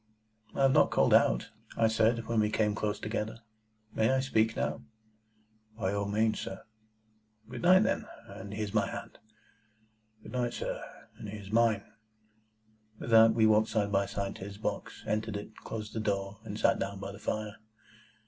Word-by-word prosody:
"I 135 - +1
have 135 - +6
not - - +5
called - - +3
out," - - +4 0.3
I 115 - +4
said, 110 +1 +2
when 115 -1 0
we 105 0 +3
came 105 -1 +1
close 105 0 -2
together; 110 +1 -4 0.5
"may 110 - +2
I 130 - +3
speak 115 -4 +1
now?" - - -2 1.0
"By 100 -4 -1
all 100 0 -1
means, 110 +2 +1
sir." 95 - -6 0.8
"Good - - -7
night, 185 +3 +6
then, - - -1 0.2
and 100 +1 -9
here's 105 -1 -4
my 105 - +2
hand." - - -8 1.0
"Good - - -10
night, 120 -2 -1
sir, - - -4 0.4
and 105 - -7
here's 100 -1 -8
mine." 110 -3 +3 1.1
With 115 - -6
that 110 0 +7
we 110 -2 +4
walked 110 0 +4
side 105 -2 0
by 100 0 +2
side 100 0 -3
to - - -8
his 100 0 -8
box, 105 - -4
entered 110 0 -1
it, 105 +2 -9
closed 110 -1 -6
the - - -2
door, 100 -1 -2
and - - -6
sat - - +3
down 100 0 -3
by 100 0 -5
the 100 - -11
fire. 110 -1 -3
110 Hz, 175 wpm, -30 LUFS, 100-115 Hz, 1.1 s, that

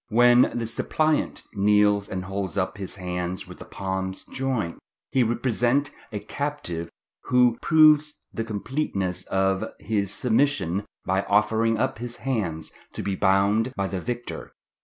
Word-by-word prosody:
"When 120 +2 +5
the 115 - -1
suppliant 155 +6 0
kneels 105 0 +3
and 95 -1 -4
holds 95 -1 -4
up 95 +2 -1
his 95 - -5
hands 90 -1 -4
with - - -11
the - - -9
palms 95 -1 -4
joined, 130 -10 -2 0.3
he 130 - +3
represents 120 +4 +1 0.2
a 105 - -3
captive 105 - -4 0.4
who 125 -2 +4
proves 155 -1 +5 0.2
the 115 - -2
completeness 100 - -2
of 95 0 +1 0.2
his 100 -2 -1
submission 110 - +1 0.2
by 95 +1 +1
offering 110 +1 +3
up 130 0 -1
his 120 0 -5
hands 100 -12 -3 0.2
to - - -5
be 100 -1 -1
bound 100 +6 +2
by 100 - -1
the 95 -1 -4
victor. 120 +2 -5
105 Hz, 140 wpm, -25 LUFS, 95-125 Hz, 0.4 s, When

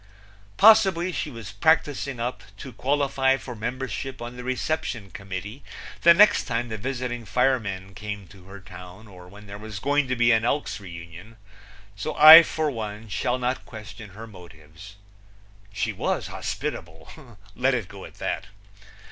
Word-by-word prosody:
Possibly 195 -5 +5
she 155 - -4
was 115 -6 -9
practicing 145 -5 +1
up 120 +2 -4 0.2
to 130 +4 -9
qualify 135 -1 +1
for 125 -2 -9
membership 130 +3 -5
on 120 +1 -7
the 125 - -8
reception 125 - -3
committee 100 +7 -7 0.4
the 170 0 +7
next 210 +4 +5
time 120 -1 -2
the 110 - -4
visiting 125 0 -4
firemen 105 -4 -1
came 105 0 -7
to 95 -3 -16
her 100 +1 -11
town 90 +2 -13
or 90 -3 -14
when 105 +3 -14
there 100 0 -9
was 110 -1 -8
going 145 +6 +1
to 130 - -1
be 120 0 +3
an 110 -1 +3
Elks' 140 +2 -1
reunion; 85 +3 -11 0.6
so 100 - -5
I 155 +2 +11
for 155 -2 -2
one 110 -2 -7
shall 125 +5 -1
not 125 +1 -2
question 110 -1 -11
her 115 - -8
motives. 90 -1 -14 0.8
She 100 - -2
was - - -2
hospitable 90 - -7 0.2
let 130 +2 +1
it 115 -7 -3
go 100 -1 -11
at - - -12
that. 110 - -4
115 Hz, 155 wpm, -24 LUFS, 100-135 Hz, 0.8 s, I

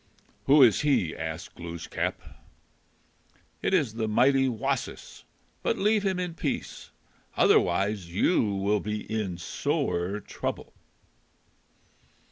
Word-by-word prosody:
"Who 140 +1 +7
is 115 -5 +5
he?" 135 - +1
asked 80 +2 -6
Glooskap. 85 -1 -4 1.4
"It - - 0
is 150 - +2
the 110 -1 -2
mighty 135 +5 +3
Wasis. 115 -3 -4 0.4
But - - 0
leave 210 +1 +2
him 190 -2 -1
in 180 -2 -3
peace. - - -4 0.5
Otherwise 100 -3 +2
you 105 - +3
will 100 +2 +1
be 105 +1 -4
in 100 -5 -2
sore 90 +2 -2
trouble." - - -5
105 Hz, 105 wpm, -27 LUFS, 90-140 Hz, 1.4 s, Who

